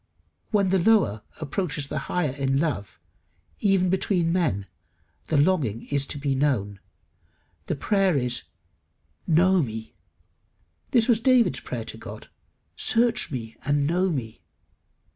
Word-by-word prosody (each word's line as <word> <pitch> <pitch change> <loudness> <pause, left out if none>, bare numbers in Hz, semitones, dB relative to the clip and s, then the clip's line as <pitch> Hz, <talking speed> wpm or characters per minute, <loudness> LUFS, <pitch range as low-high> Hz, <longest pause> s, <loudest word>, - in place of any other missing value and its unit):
When 200 -3 +2
the 190 0 +3
lower 180 - +3 0.2
approaches 155 -1 -3
the - - -3
higher 175 -6 0
in 135 0 0
love, 140 - -2 0.6
even 195 -3 +2
between 180 -3 +1
men, 150 - 0 0.6
the 155 - +1
longing 140 - +1
is 140 -1 0
to - - -4
be 140 -1 -1
known; 120 -8 0 0.9
the - - -1
prayer 195 +1 +2
is 125 -1 -1 0.8
"Know 180 +3 +4
me." 110 -4 -5 1.0
This 235 -3 +3
was 235 -4 +4
David's 250 -1 +3
prayer - - -5
to - - -7
God, - - -10 0.5
"Search 240 +1 +1
me 115 -4 -6
and 145 0 +1
know 180 +5 +1
me." 120 -9 -4
155 Hz, 130 wpm, -25 LUFS, 135-190 Hz, 1.0 s, Know